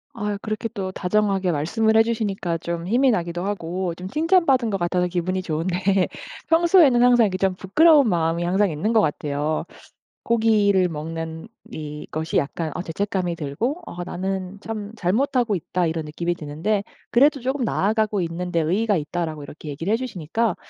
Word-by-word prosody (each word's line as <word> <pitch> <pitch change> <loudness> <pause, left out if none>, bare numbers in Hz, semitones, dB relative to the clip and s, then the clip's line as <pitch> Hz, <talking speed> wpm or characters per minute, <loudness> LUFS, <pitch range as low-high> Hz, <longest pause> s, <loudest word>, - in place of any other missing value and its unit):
아유 210 -3 -2
그렇게 215 +1 -3
또 190 -4 -3
다정하게 195 -1 +1
말씀을 220 +9 +1
해 225 - +7
주시니까 200 -7 -2
좀 170 +1 -4
힘이 255 +5 +3
나기도 175 -3 -2
하고 180 -2 -3
좀 180 +2 -7
칭찬받은 300 - +2
것 200 - -1
같아서 180 0 0
기분이 185 +1 -1
좋은데 180 +3 0 0.4
평소에는 330 -6 +5
항상 245 -2 +6
이렇게 185 -2 -1
좀 190 -1 +1
부끄러운 290 - +5
마음이 170 -1 0
항상 190 +3 +2
있는 165 +9 -1
것 220 - +5
같아요. 150 -1 -1 0.6
고기를 210 -5 +3
먹는 160 +2 -6 0.2
이것이 155 +1 -4
약간 155 +3 -2
아 - - -2
죄책감이 185 0 -2
들고 170 - -3
어 175 - -6
'나는 190 +1 -4
참 215 -1 -6
잘못하고 235 +4 +1
있다.' 180 +1 -1
이런 160 -1 -2
느낌이 170 +3 -2
드는데 170 +6 -2 0.3
그래도 280 +4 +4
"조금 265 +2 -1
나아가고 215 -1 +1
있는 175 +1 -3
데 165 -1 +2
의의가 205 +7 +1
있다."라고 155 0 -3
이렇게 150 +2 -11
얘기를 165 +7 -3
해 - - +3
주시니까 225 -3 -2
185 Hz, 380 characters per minute, -23 LUFS, 170-220 Hz, 0.6 s, 해